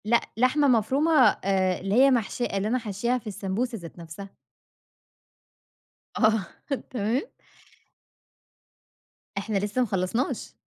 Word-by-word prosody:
لأ 235 +2 +3 0.2
لحمة 255 +5 +3
مفرومة 260 +6 +2 0.3
آآ 185 -1 +1
اللي 195 +2 -1
هي 270 +3 +6
محشية 240 0 0
اللي 195 -1 -2
أنا 240 +4 +1
حاشياها 230 +2 -1
في 240 - -10
السمبوسة 210 +5 -3
ذات 170 -2 -11
نفْسها. 170 +4 -9 1.9
آه 220 -2 +3 0.5
تمام. 235 +2 0 2.2
إحنا 200 +1 -1
لسه 205 +5 -1
ما 245 - +1
خلّصناش 195 +7 -2
220 Hz, 115 wpm, -26 LUFS, 195-250 Hz, 2.2 s, هي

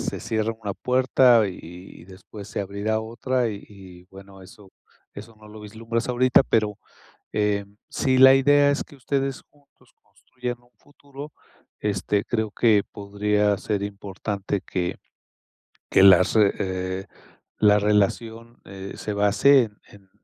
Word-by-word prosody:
se - - -4
cierra 110 0 -2
una 100 -2 -4
puerta, 125 -3 +3
y 90 - -8 0.4
y - - -14
después 95 +2 -12
se - - -4
abrirá 100 +3 -2
otra, 120 +2 -2
y 100 -2 -7
y 95 -3 -15
bueno, 95 0 -14
eso 95 +1 -16 0.4
eso 110 +2 -11
no 105 - -15
lo 105 0 -12
vislumbras 115 +3 -5
ahorita. 125 +1 +4
Pero, 105 -5 -1 0.6
eh, 105 -1 0 0.2
si 130 -1 0
la 130 +1 +8
idea 145 +1 +4
es 140 - -2
que - - -17
ustedes 135 0 -3
juntos 145 -1 -29
construyan 125 -1 -8
un 120 0 -29
futuro, 145 +1 -13 0.5
este, 100 0 -1
creo 110 -2 -2
que 105 -2 +3
podría 105 0 -1
ser 100 -1 -3
importante 100 0 -5
que 90 -1 -3 1.0
que - - +4
las 95 0 +6
re 105 -3 +4
eh, 95 -1 -4 0.5
la 105 -1 +5
relación, 110 +3 -1
eh, 95 0 -9
se 105 - -5
base 105 +7 +4
en 105 -2 -9
en, 100 -2 -19
105 Hz, 145 wpm, -23 LUFS, 100-120 Hz, 1.0 s, la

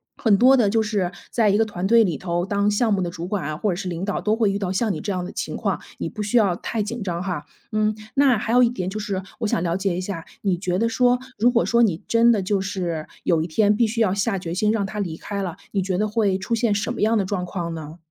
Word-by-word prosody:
很 210 -4 +3
多 260 +4 +6
的 225 -6 +3
就 220 +2 +2
是 205 -5 -1 0.2
在 220 -3 +3
一 200 - +3
个 225 - +3
团 190 -3 -3
队 230 +1 +6
里 170 -9 -1
头 175 -1 -1
当 200 +1 +1
项 210 +1 +2
目 195 - +1
的 175 - -1
主 170 0 -6
管 195 -4 -2
啊， 155 +1 -3
或 205 +4 0
者 - - -1
是 185 +1 -4
领 175 +2 -3
导， 205 - -2
都 215 +1 +1
会 220 -3 +2
遇 200 - -2
到 190 -3 -2
像 205 +1 0
你 - - -5
这 205 - -3
样 180 -1 -2
的 - - -7
情 - - -4
况， - - -1 0.2
你 - - -3
不 215 - -6
需 210 +4 +1
要 195 -6 +3
太 215 +4 -3
紧 230 +3 -5
张 180 -2 -3
哈。 180 -6 -4 0.2
嗯， 215 0 +1 0.2
那 270 -4 +4
还 225 +2 -2
有 250 - +6
一 240 - +5
点 185 -7 -4
就 215 - -4
是 195 -2 -3 0.2
我 225 - 0
想 170 - 0
了 170 -1 0
解 190 -2 -1
一 - - -2
下， 185 -3 -5 0.2
你 190 -3 +2
觉 180 0 -2
得 230 +4 +2
说， 245 +2 +3 0.2
如 240 +3 +5
果 235 -1 +2
说 235 0 +3
你 185 -8 +2
真 230 +1 +5
的 205 -4 +1
就 195 0 0
是， 175 -5 -3 0.2
有 165 -2 +2
一 160 - -2
天 205 +5 +3
必 230 +1 +3
须 230 +2 -2
要 200 -4 +3
下 200 0 0
决 170 -2 -5
心 210 +4 +2
让 215 -3 0
他 210 +2 -5
离 165 -5 -3
开 200 -1 -4
了， 180 -2 -4
你 195 - 0
觉 185 -1 -1
得 210 +2 +1
会 210 -3 +1
出 195 +5 -4
现 230 -2 +2
什 205 - -1
么 - - -6
样 220 +2 +3
的 195 - +1
状 185 -1 -2
况 175 -2 -4
呢？ 160 0 -8
200 Hz, 320 characters per minute, -23 LUFS, 180-220 Hz, 0.2 s, 多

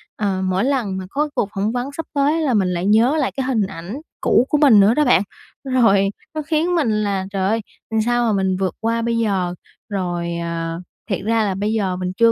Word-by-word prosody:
ờ, 195 -3 -1
mỗi 185 +2 0
lần 245 -8 0
mà 190 - -5
có 300 +5 -1
cuộc 200 - 0
phỏng 205 +3 0
vấn 250 +3 -3
sắp 325 - -3
tới 295 +3 +2
là 275 -6 +1
mình 195 -4 +2
lại 180 0 -2
nhớ 225 +8 +4
lại 285 -4 0
cái 265 - 0
hình 230 -6 +1
ảnh 190 +2 -7 0.3
cũ 245 - +3
của 300 - +2
mình 275 -8 +6
nữa 200 +3 +5
đó 300 +1 +2
bạn. 245 -6 +5 0.4
Rồi 225 -7 +3 0.3
nó 310 - -1
khiến 315 +3 0
mình 220 -10 +1
là 195 -2 -1
"Trời 195 -1 0
ơi, 225 +1 0 0.4
sao 240 0 +2
mà 225 - +2
mình 190 -1 0
vượt 190 -1 -2
qua 230 +1 0
bây 230 0 0
giờ?" 190 -6 0 0.3
Rồi, 175 -4 -2
à, 165 -1 -3 0.3
thiệt 195 - 0
ra 225 +1 +2
là 195 -2 -1
bây 210 +2 -1
giờ 195 -4 0
mình 180 0 -3
chưa 230 0 +5
215 Hz, 230 wpm, -20 LUFS, 190-250 Hz, 0.4 s, mình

